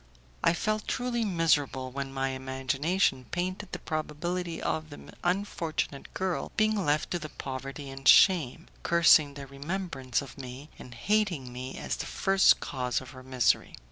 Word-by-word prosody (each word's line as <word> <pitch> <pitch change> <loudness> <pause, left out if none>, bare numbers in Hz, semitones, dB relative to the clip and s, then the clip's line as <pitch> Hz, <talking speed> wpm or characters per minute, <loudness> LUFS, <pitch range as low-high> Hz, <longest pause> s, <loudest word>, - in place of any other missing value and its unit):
I - - +5
felt 215 +4 -1
truly 245 -2 -1
miserable 150 -9 +1
when 135 +1 -4
my 135 0 -1
imagination 130 +3 0
painted 185 +2 -3
the - - -3
probability 165 +3 -3
of 155 0 -2
the 145 - -11
unfortunate 175 -6 -2
girl 185 -1 -2
being 215 -2 +2
left 150 -1 +1
to 170 -4 -3
poverty 135 +1 -6
and 135 -1 -5
shame, 165 -4 +6 0.2
cursing 160 -4 +5
the 140 -1 -7
remembrance 140 -2 -3
of 140 0 -12
me, 130 +3 -9
and 125 - -10
hating 175 - 0
me 130 +1 -6
as - - -3
the - - -4
first 195 0 +4
cause 125 -3 -2
of 130 - -11
her 130 -1 -11
misery. 130 -2 +1
150 Hz, 150 wpm, -29 LUFS, 135-180 Hz, 0.2 s, shame